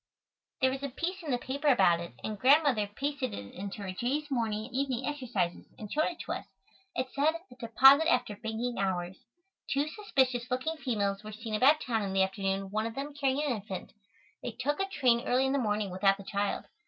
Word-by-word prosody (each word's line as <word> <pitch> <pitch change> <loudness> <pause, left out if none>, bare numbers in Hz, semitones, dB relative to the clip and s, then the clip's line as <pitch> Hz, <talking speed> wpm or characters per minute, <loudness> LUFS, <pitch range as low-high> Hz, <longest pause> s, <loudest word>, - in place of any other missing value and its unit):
There 260 0 +4
was 265 +1 -4
a 280 - -3
piece 360 +8 -3
in 320 - -7
the 250 - +2
paper 275 +4 -3
about 175 -11 +5
it, 170 0 -8
and 215 -2 -4
Grandmother 270 -5 +4
pasted 275 +2 -3
it 100 0 -8
into 200 +2 -6
her 190 - -4
"Jay's 280 +9 -2
Morning 220 -4 -1
and 250 - -12
Evening 260 -1 -1
Exercises," 250 -12 -2
and 210 -2 -7
showed 310 +1 +3
it 345 - -5
to - - -6
us. - - -4 0.5
It 255 0 -2
said, 300 +3 +2 0.2
"A - - -12
Deposit 270 +7 +6
After 245 -4 +1
Banking 225 +1 -3
Hours." 185 -1 -1 0.5
"Two 280 +2 +1
suspicious 265 - 0
looking 260 +6 -1
females 205 -7 -1
were 215 - -7
seen 220 +1 -7
about 275 +8 +5
town 225 -3 0
in 195 -2 -3
the 195 0 +4
afternoon, 195 0 -2
one 215 +2 0
of 230 - -7
them 285 +2 -4
carrying 280 0 0
an 265 -6 0
infant. 195 -3 -7 0.5
They 240 - -5
took 280 +7 -1
a 390 - 0
train 245 -9 +2
early 255 +2 +3
in 265 - +1
the 280 - +2
morning 210 -4 0
without 195 +2 +3
the 200 - -10
child. 200 +1 -2
245 Hz, 215 wpm, -30 LUFS, 205-275 Hz, 0.5 s, Deposit